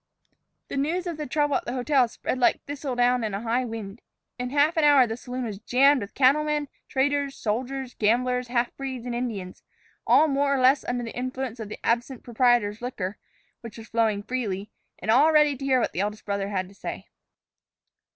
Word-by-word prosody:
The - - -4
news 330 +6 -1
of 340 -3 -4
the 300 - -4
trouble 290 0 +1
at - - -7
the 240 - -4
hotel 260 0 +2
spread 255 +2 -4
like 245 - +2
thistle 280 -2 -4
down 245 0 +2
in 210 -3 -2
a 200 - -4
high 235 +2 0
wind. 225 -2 -7 0.4
In 250 0 -3
half 290 +5 +2
an 320 - +2
hour 285 -3 +6
the 225 -1 -4
saloon 250 +1 -6
was 210 -4 -5
jammed 265 +4 +4
with 200 - -8
cattlemen, 295 +2 +2 0.2
traders, 280 +1 0
soldiers, 250 +4 -3
gamblers, 250 +3 +1
half 240 0 -1
breeds, 260 -3 -5
and 245 - -3
Indians, 220 -7 -4 0.5
all 315 - +6
more 280 -1 +1
or - - 0
less 260 +2 +4
under 245 0 -2
the 230 - -7
influence 255 -1 -4
of 215 -2 -6
the - - -6
absent 240 +2 -1
proprietor's 240 -3 +2
liquor, 210 -6 -4 0.4
which 230 -1 -10
was 225 0 -11
flowing 220 -3 +1
freely, 210 -5 -3 0.3
and 215 - -1
all 285 +7 +5
ready 300 -2 +4
to 270 +1 -7
hear 260 -2 +3
what - - 0
the - - -5
eldest 210 +2 -3
brother 200 -1 -2
had 185 -2 -2
to 195 - -16
say. - - -7
250 Hz, 200 wpm, -25 LUFS, 225-275 Hz, 0.5 s, hour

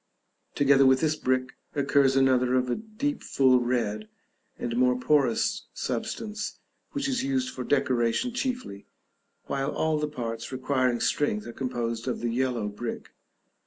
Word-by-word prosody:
Together 140 -1 +5
with 130 0 +5
this 155 +1 +1
brick 130 -3 0 0.2
occurs 140 -1 +3
another 130 -1 +3
of 125 -1 +1
a - - +1
deep 225 +7 -3
full 130 -2 +4
red, 110 -4 -1 0.5
and 120 -1 -3
more 125 0 +3
porous 150 - +1
substance, 215 -1 -3 0.4
which 285 -2 -1
is 265 0 0
used 260 -1 -1
for - - -5
decoration 130 - +1
chiefly, 250 - -4 0.6
while 135 0 -1
all 160 -1 0
the 150 - 0
parts 115 -5 -5
requiring 130 -2 0
strength 105 -8 0
are 120 - -7
composed 120 -2 -3
of 125 - -1
the 120 -1 -1
yellow 125 -4 0
brick. 110 +3 -5
130 Hz, 145 wpm, -27 LUFS, 120-150 Hz, 0.6 s, Together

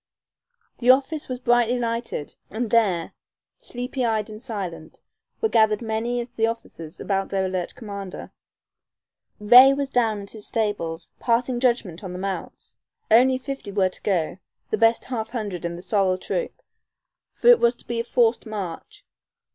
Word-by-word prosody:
The 245 - +1
office 275 +4 +3
was 255 - -3
brightly 240 0 +2
lighted, 230 -9 -3
and 220 +1 -3
there, 195 -8 +2 0.5
sleepy 255 - -4
eyed 220 -2 0
and 215 +1 -9
silent, 185 -10 -6 0.4
were 445 - +3
gathered 220 - +3
many 230 +2 -1
of 240 0 -10
the 225 0 +2
officers 175 -8 -7
about 195 -1 -1
their 190 -1 0
alert 185 -2 -3
commander. 200 -4 -7 1.1
Ray 250 +6 +8
was 275 -1 -2
down 225 -4 +1
at 200 - -10
his 215 -2 -7
stables, 170 -7 -2
passing 240 +1 +1
judgment 235 -8 0
on 185 -2 -6
the - - -5
mounts. 195 0 -6 0.3
Only 255 +3 +6
fifty 260 -5 -6
were 190 -2 +2
to - - -12
go, 180 -3 -1 0.3
the - - +1
best 225 0 +3
half 225 -4 -4
hundred 205 -8 -4
in 170 0 -3
the 175 - -9
sorrel 190 -1 +1
troop, 480 - -4 0.7
for 485 - +2
it 485 - +8
was 235 +1 +3
to - - -16
be 235 -1 -3
a - - 0
forced 235 -1 +1
march. 215 - -7
225 Hz, 165 wpm, -24 LUFS, 195-245 Hz, 1.1 s, Ray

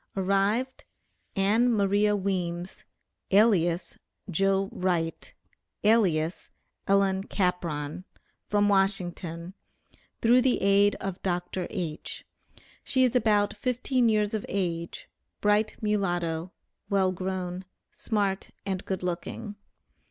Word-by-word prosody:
Arrived, 200 +7 0 0.5
Ann 215 +5 +3
Maria 205 -1 +2
Weems, 180 -2 -3 0.4
alias 190 -5 +3 0.3
'Joe 195 +2 +2
Wright,' 175 -3 -2 0.5
alias 185 -7 +2 0.4
'Ellen 195 -1 +3
Capron,' 175 -5 -2 0.4
from 205 0 +2
Washington, 185 -3 0 0.7
through 240 +2 +5
the 255 0 +2
aid 200 +1 +4
of 195 -1 -5
Dr. 180 0 -2
H. 170 -6 -5 0.6
She 260 -2 +2
is 255 -1 +2
about 210 -4 +2
fifteen 250 +2 +1
years 210 -1 +1
of 215 - -2
age, 170 -4 -3 0.3
bright 210 +1 +2
mulatto, 175 -5 -1 0.4
well 195 -2 +2
grown, 185 0 -4 0.3
smart 200 -3 -1 0.2
and 190 -1 -2
good 190 -1 -3
looking. 180 +4 -4
195 Hz, 100 wpm, -27 LUFS, 180-210 Hz, 0.7 s, through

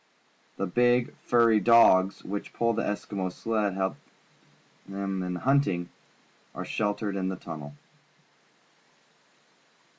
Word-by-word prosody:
The 100 - -1
big, 120 +5 +2
furry 115 -2 +3
dogs, 100 -4 +5
which 100 +1 -6
pull 115 0 +1
the - - -1
Eskimo's 100 -2 -3
sled 110 -2 -1
and 95 -2 -2
help 95 0 -1 0.9
him 95 -1 -3
in 90 0 -3
hunting, 100 -6 +1 0.7
are - - -5
.sheltered 105 -1 -2
in 95 -1 -1
the 95 - -3
tunnel. 75 -4 -9
100 Hz, 115 wpm, -27 LUFS, 95-115 Hz, 0.9 s, dogs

